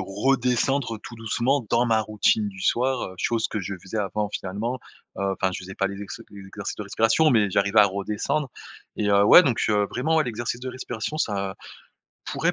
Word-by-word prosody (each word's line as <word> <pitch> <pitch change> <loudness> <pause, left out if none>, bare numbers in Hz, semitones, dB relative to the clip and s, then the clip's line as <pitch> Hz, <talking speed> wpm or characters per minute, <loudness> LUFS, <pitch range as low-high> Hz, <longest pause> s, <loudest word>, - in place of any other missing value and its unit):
redescendre 125 +4 0
tout - - -9
doucement 120 +4 0
dans 120 +1 +3
ma 110 -1 +3
routine 110 0 +1
du 95 -1 -12
soir, 125 -5 0
chose 115 +2 0
que - - -3
je 95 +2 -4
faisais 95 +4 -6
avant 105 +1 -1
finalement. 105 +6 -4 0.4
Heu, 100 0 0
enfin, 95 0 0
je - - -5
faisais 95 +1 -9
pas 100 - 0
les 100 +1 -6
exer 100 - -8
les 100 -1 -11
exercices - - -6
de - - -5
respiration, 115 +8 +3
mais 105 -4 +3
j'arrivais 100 +3 +3
à 105 - +7
redescendre. 105 +8 -2 0.5
Et 105 - 0
heu, 100 0 +5
ouais, 175 - +9
donc, 130 -9 0
heu, 105 -1 +2
vraiment 155 +7 0
ouais, 155 - +3
l'exercice 120 +1 -3
de 130 - -5
respiration, 125 +1 -5
ça 100 -7 -1 0.7
pourrait - - 0
110 Hz, 195 wpm, -24 LUFS, 100-125 Hz, 0.7 s, ouais